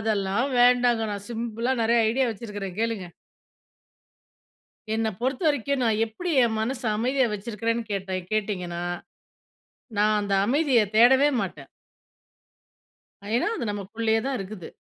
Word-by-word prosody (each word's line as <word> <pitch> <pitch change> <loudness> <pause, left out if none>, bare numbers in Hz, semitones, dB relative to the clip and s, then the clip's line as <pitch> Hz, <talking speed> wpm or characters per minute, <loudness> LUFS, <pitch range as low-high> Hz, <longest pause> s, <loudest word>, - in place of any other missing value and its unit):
அதெல்லாம் 215 +3 0
வேண்டாங்க. 245 -1 +4
நான் 200 0 -6
சிம்பிளா 235 +1 -2
நெறைய 235 +1 +3
ஐடியா 260 +3 +1
வச்சிருக்கறேன், 205 -4 -7
கேளுங்க. 225 -5 -2 1.9
என்ன 225 0 0
பொறுத்த 260 +5 -1
வரைக்கும், 280 -1 0
நான் 220 -1 +1
எப்படி 345 +12 -5
என் 225 -2 0
மனசு 245 +3 -3
அமைதியா 255 +4 +1
வச்சிருக்கிறேன்னு 230 +2 -2
கேட்டா 190 -1 -3 0.2
கேட்டிங்கன்னா? 180 -5 -2 1.2
நான் 210 0 +3
அந்த 200 -1 -1
அமைதிய 270 0 +3 0.2
தேடவே 265 +5 +6
மாட்டேன். 155 -8 -5 1.7
ஏன்னா? 250 - +1
அது 245 - -3
நமக்குள்ளயே 220 +3 -1
தான் 270 -1 -1
இருக்குது. 195 -2 -7
225 Hz, 115 wpm, -25 LUFS, 205-245 Hz, 1.9 s, தேடவே